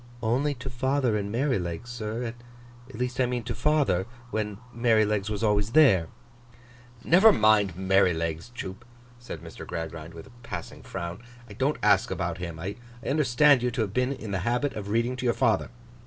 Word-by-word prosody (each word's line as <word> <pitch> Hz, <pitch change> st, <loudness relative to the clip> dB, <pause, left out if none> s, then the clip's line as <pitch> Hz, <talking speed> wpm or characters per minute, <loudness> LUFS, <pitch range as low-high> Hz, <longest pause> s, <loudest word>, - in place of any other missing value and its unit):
'Only 135 Hz, +6 st, +1 dB
to 125 Hz, +1 st, -8 dB
father 130 Hz, -1 st, +1 dB
and 100 Hz, -1 st, -2 dB
Merrylegs, 115 Hz, -, -1 dB
sir. 115 Hz, 0 st, -4 dB, 0.6 s
At 135 Hz, -, -11 dB
least 125 Hz, +2 st, -3 dB
I 125 Hz, -, +3 dB
mean 125 Hz, -1 st, -2 dB
to 120 Hz, -, -3 dB
father, 115 Hz, -12 st, +1 dB, 0.2 s
when 105 Hz, -2 st, -2 dB, 0.2 s
Merrylegs 110 Hz, -3 st, +2 dB
was 105 Hz, +1 st, -3 dB
always 105 Hz, 0 st, +1 dB
there.' 115 Hz, -, +6 dB, 1.0 s
'Never 190 Hz, +7 st, +7 dB
mind 105 Hz, -, +3 dB
Merrylegs, 90 Hz, -3 st, +1 dB
Jupe,' 120 Hz, -2 st, -7 dB, 0.4 s
said 120 Hz, -, -8 dB
Mr. -, -, -10 dB
Gradgrind, 80 Hz, 0 st, -6 dB
with 80 Hz, -, -9 dB
a -, -, -16 dB
passing 115 Hz, -, -7 dB
frown. 85 Hz, +3 st, -6 dB, 0.3 s
'I 105 Hz, -, -11 dB
don't 135 Hz, +7 st, 0 dB
ask 100 Hz, -2 st, +4 dB
about 85 Hz, -2 st, -3 dB
him. 85 Hz, -2 st, -5 dB
I 95 Hz, +5 st, -5 dB, 0.3 s
understand 140 Hz, -1 st, +4 dB
you 125 Hz, -, +1 dB
to 120 Hz, 0 st, -2 dB
have 100 Hz, -3 st, -2 dB
been 125 Hz, +3 st, +1 dB
in 115 Hz, -6 st, -6 dB
the 100 Hz, -, -1 dB
habit 120 Hz, +8 st, 0 dB
of 100 Hz, -2 st, -6 dB
reading 115 Hz, +4 st, +1 dB
to 125 Hz, -, -4 dB
your 120 Hz, -, +2 dB
father? 115 Hz, -4 st, +2 dB
110 Hz, 175 wpm, -27 LUFS, 95-125 Hz, 1.0 s, Never